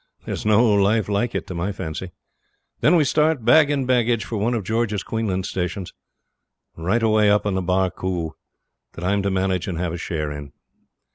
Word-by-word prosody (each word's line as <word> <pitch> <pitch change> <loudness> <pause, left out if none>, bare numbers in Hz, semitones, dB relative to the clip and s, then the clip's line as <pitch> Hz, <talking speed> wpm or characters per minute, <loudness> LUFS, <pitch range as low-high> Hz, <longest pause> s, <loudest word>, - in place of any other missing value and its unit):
There's - - -4
no 110 +3 +5
life 100 +1 +2
like 105 +4 0
it, - - -2
to - - -7
my 85 +4 -2
fancy. 95 -1 -5 0.7
Then 165 - +4
we 160 - +5
start, 150 -3 +1
bag 155 -2 +6
and 140 -3 0
baggage, 120 -3 +1
for 115 - -4
one 115 +4 0
of 110 - -2
George's 110 -1 -1
Queensland 100 -5 -2
stations, 90 0 -4 0.8
right 95 +8 0
away 110 -1 +4
up 105 0 +3
on 100 - 0
the 95 - 0
Barcoo, 90 -2 -1 0.6
that 85 - -8
I'm 100 +2 +1
to 100 - 0
manage 95 -1 0
and 90 -4 -3
have 85 -1 -2
a - - -3
share 75 -3 -3
in. 75 -1 -8
100 Hz, 190 wpm, -22 LUFS, 90-115 Hz, 0.8 s, bag